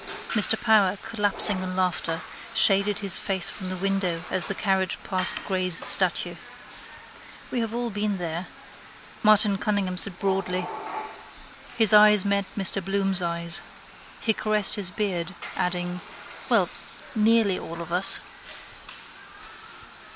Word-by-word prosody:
Mr - - +3
Power, 205 -4 +2
collapsing 205 -2 +4
in 185 0 -6
laughter, 180 -3 -2 0.3
shaded 200 +1 +3
his 195 -2 +1
face 190 -3 -2
from 185 -2 -8
the 185 - -5
window 185 -3 -3
as 185 - -1
the 195 - -4
carriage 190 -2 -2
passed 185 -1 +2
Gray's 185 -3 +2
statue. - - +4 1.2
—We 250 - -3
have 225 -2 -4
all 240 0 -4
been 205 0 -3
there, 170 0 -6 0.7
Martin 210 -2 +4
Cunningham 195 -3 -3
said 190 -2 -2
broadly. 185 -2 -3 1.1
His 220 -2 +6
eyes 210 -1 +6
met 200 0 -1
Mr 195 0 +3
Bloom's 195 0 -1
eyes. 170 0 +1 0.6
He 220 - 0
caressed 215 -1 +2
his 200 -4 0
beard, 180 -4 -4 0.2
adding: 180 0 -4 0.5
—Well, - - +2 0.5
nearly 220 -3 +1
all 170 +1 -9
of 170 0 -8
us. 185 +2 0
195 Hz, 125 wpm, -23 LUFS, 180-205 Hz, 1.2 s, His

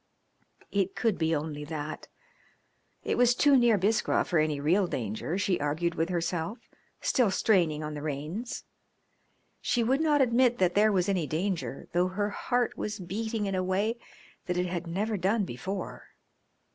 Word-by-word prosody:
It 195 -1 0
could 220 -7 0
only 160 -2 0
be - - -6
that. 155 0 -5 1.0
It - - -1
was 245 0 +5
too 285 +2 +5
near 240 -4 +5
Biskra 210 +4 +2
for 175 - +1
any 155 -2 +1
real 175 +7 +2
danger, 115 - -3
she 195 -2 +1
argued 155 +4 0
with 165 +1 -1
herself, 175 +3 -2 0.4
still 245 -5 +3
straining 170 -7 +2
on 150 0 -4
the 145 - -5
reins. 155 - -4 1.0
She 240 - +1
would 265 +6 +2
not 300 -2 +3
admit 245 -1 +3
that 180 -2 +2
there 215 +1 +4
was 185 -3 +1
any 185 -6 0
danger, 170 -3 -2
though 175 +1 +3
her 205 +3 -2
heart 245 +3 0
was 215 +1 -4
beating 215 +4 -3
in 195 - -2
a 185 -1 0
way 205 +6 0 0.5
that 180 -1 -1
it 180 - +1
had 175 -1 -3
never 205 +5 -1
done 200 +3 +1
before. 190 +9 -6
185 Hz, 165 wpm, -29 LUFS, 160-220 Hz, 1.0 s, was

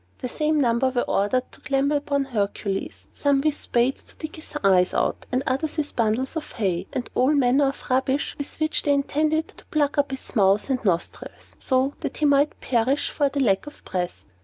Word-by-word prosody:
The - - -4
same 305 +4 0
number 245 0 +2
were 245 -1 0
ordered 250 +6 0
to - - -17
clamber 280 +1 +1
upon 285 -1 0
Hercules, 200 -5 -3
some 285 -1 +2
with 305 +1 +2
spades 245 -1 0
to - - -14
dig 310 -1 -7
his 315 - -8
eyes 185 -2 +4
out, - - -1
and 255 +1 +1
others 280 +5 -1
with 300 -1 -2
bundles 230 +6 0
of 315 -1 -5
hay, 190 -5 -1
and 250 - -3
all 260 +4 +3
manner 275 +1 +4
of 275 - -4
rubbish 265 +2 +1
with 285 - -4
which 310 0 +1
they 290 - +2
intended 310 +3 0
to - - -15
plug 295 -3 0
up 285 - +2
his 265 0 -6
mouth 200 +4 +3
and 255 - -1
nostrils, 175 -5 -3
so 260 +1 +1
that - - -4
he 305 - +1
might 285 +1 +3
perish 255 +3 +1
for 285 -2 +1
lack 240 -5 +2
of 295 - -12
breath. 180 -1 -3
270 Hz, 200 wpm, -24 LUFS, 235-290 Hz, -, eyes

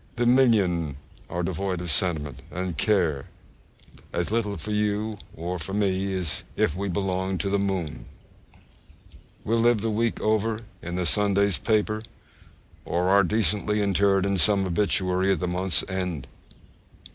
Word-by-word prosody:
The 120 0 0
million 100 - +3 0.3
are 90 +1 -2
devoid 95 +1 -2
of 85 -2 +1
sentiment, 75 -5 0
and 90 +1 -4
care 80 -7 +1 0.9
as 85 +3 -2
little 105 -3 -1
for 80 +6 -6
you 105 +1 0 0.2
or 90 +2 -4 0.2
me 100 -1 0
as 90 -5 -2
if 75 - +1
we 100 +2 -3
belonged 95 0 -1
to 100 - -2
the 100 - +2
moon. 95 -6 -3 1.4
We 110 - -2
live 115 -1 +3
the 110 0 -1
week 115 +2 0
over 110 +1 0 0.2
in 85 +1 -5
the 90 0 -1
Sunday's 100 -1 +3
paper, 110 -1 0 0.8
or 90 +2 0
are 100 +1 +6
decently 105 +1 +1
interred 100 0 +2
in 100 0 0
some 100 +2 +4
obituary 95 0 +1
at - - -2
the 90 - -2
month's 90 +1 +1
end! 90 -6 -3
95 Hz, 145 wpm, -25 LUFS, 90-105 Hz, 1.4 s, are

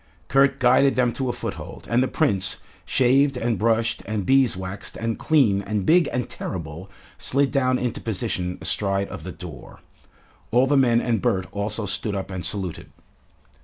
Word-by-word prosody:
Kurt 135 0 +4
guided 130 +2 +4
them 125 -2 +2
to 130 -2 -2
a - - +2
foothold, - - -7
and 120 +2 +2
the 130 - +2
Prince, 100 - +1 0.3
shaved 135 +2 +3
and 120 -2 -1
brushed 115 +1 +1
and 105 -3 -2
beeswaxed 100 -8 0
and 115 0 -3
clean 120 -11 +3
and 100 -1 -2
big 170 -2 +4
and 125 -1 -2
terrible, 85 +1 -6 0.3
slid 140 +1 +1
down 130 -3 +2
into 125 -2 -3
position 90 -4 -3
astride 100 -1 +1
of - - -8
the 90 - -6
door. 80 -6 -11 0.7
All 125 +3 +4
the 145 +2 +2
men 120 -3 +4
and 115 -5 0
Bert 95 +1 0
also 105 +2 -2
stood 100 +1 -2
up 95 0 -4
and 90 -2 -5
saluted. 95 -6 -3
115 Hz, 165 wpm, -23 LUFS, 95-130 Hz, 0.7 s, Kurt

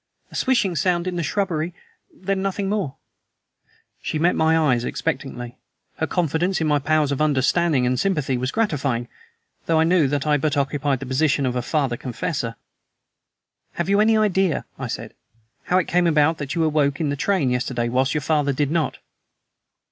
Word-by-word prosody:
"A - - -11
swishing 235 -9 +1
sound 175 0 +1
in 185 -1 -3
the 170 - -1
shrubbery, 170 -1 -1 0.4
then 190 +1 -3
nothing 195 0 -2
more." 195 -9 -2 1.1
She - - -2
met 170 +3 +2
my 160 0 +3
eyes 130 -7 +2
expectantly. 120 0 -4 0.4
Her 160 - -1
confidence 175 +1 0
in 160 - 0
my 150 -1 +2
powers 150 0 +1
of 140 - -1
understanding 150 0 +2
and 125 0 +1
sympathy 150 -9 0
was 130 +1 -1
gratifying, 140 - -1 0.6
though 165 -1 +3
I - - +5
knew 165 -3 +3
that 140 +1 -1
I 150 -1 +3
but 145 0 -1
occupied 140 -1 0
the - - -4
position 140 +1 +1
of 125 -1 -1
a 125 - 0
father 135 -2 -1
confessor. 125 -1 -3 1.2
"Have 170 +1 -3
you 200 +1 +4
any 220 +1 +4
idea," 190 -6 +1
I - - -3
said, - - -6 0.5
"how 180 - +2
it 185 - +1
came 175 0 +2
about 155 0 +3
that 145 +3 -4
you 165 - +1
awoke 150 -3 +1
in 155 -3 0
the - - -1
train 145 -3 +1
yesterday 125 -1 -1
whilst 130 +4 +1
your 150 - 0
father 145 -1 +1
did 145 +1 0
not?" 165 -2 0
155 Hz, 180 wpm, -22 LUFS, 135-175 Hz, 1.2 s, I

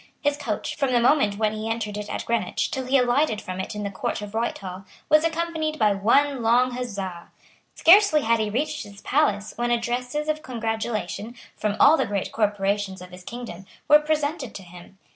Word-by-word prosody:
His 290 -1 +1
coach, 285 0 -4
from 275 -4 0
the 240 - +4
moment 235 -5 +3
when 215 0 +1
he 215 +1 -4
entered 220 -2 -3
it 210 0 -5
at - - -4
Greenwich 235 -1 -1
till 260 -1 -3
he 270 +2 +4
alighted 250 -1 +2
from 185 -3 -6
it 190 +3 -4
in 210 - -4
the 200 - -3
court 190 - -3
of 205 0 -8
Whitehall, 195 -5 -3 0.3
was 305 0 +5
accompanied 320 -1 -1
by 215 -5 +3
one 255 +7 +2
long 245 +3 +3
huzza. 200 -8 -5 0.5
Scarcely 345 -3 +6
had 230 0 +2
he 215 -1 0
reached 295 +7 -2
his 205 -1 -11
palace 215 -9 +1
when 240 0 0
addresses 245 +5 -1
of 310 0 -1
congratulation, 225 -1 -3 0.2
from 210 -1 -1
all 305 +3 +7
the - - 0
great 200 -2 -2
corporations 200 -2 -1
of 180 0 -11
his 180 0 -11
kingdom, 195 -5 -8 0.2
were 300 - +8
presented 300 -5 -2
to 195 - -8
him. 180 +2 -14
230 Hz, 195 wpm, -24 LUFS, 205-285 Hz, 0.5 s, were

